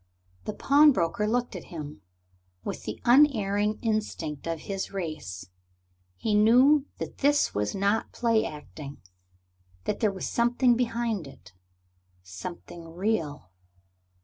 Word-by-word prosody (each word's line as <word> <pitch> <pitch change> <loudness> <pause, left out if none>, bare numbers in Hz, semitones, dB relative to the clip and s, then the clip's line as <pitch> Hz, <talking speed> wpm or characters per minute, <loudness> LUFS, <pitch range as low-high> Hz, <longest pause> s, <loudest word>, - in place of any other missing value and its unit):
The 215 - -3
pawnbroker 270 - +4
looked 245 0 -1
at 180 - -7
him. 150 -9 -8 0.6
With - - -5
the 105 - -5
unerring 215 -6 +4
instinct 210 -10 -2
of 165 -2 -3
his 195 -1 -4
race, 155 - -5 0.7
he 210 - -1
knew 255 +7 +5
that - - -7
this 290 +1 +3
was 105 - -1
not 200 +3 0
play 230 -2 +2
acting, 150 -1 -8 0.9
that - - -2
there 215 -3 +2
was 190 -2 -5
something 240 +1 +3
behind 230 - -1
it 135 - -15 0.7
something 165 - -8
real. 165 - -2
205 Hz, 120 wpm, -27 LUFS, 160-235 Hz, 0.9 s, knew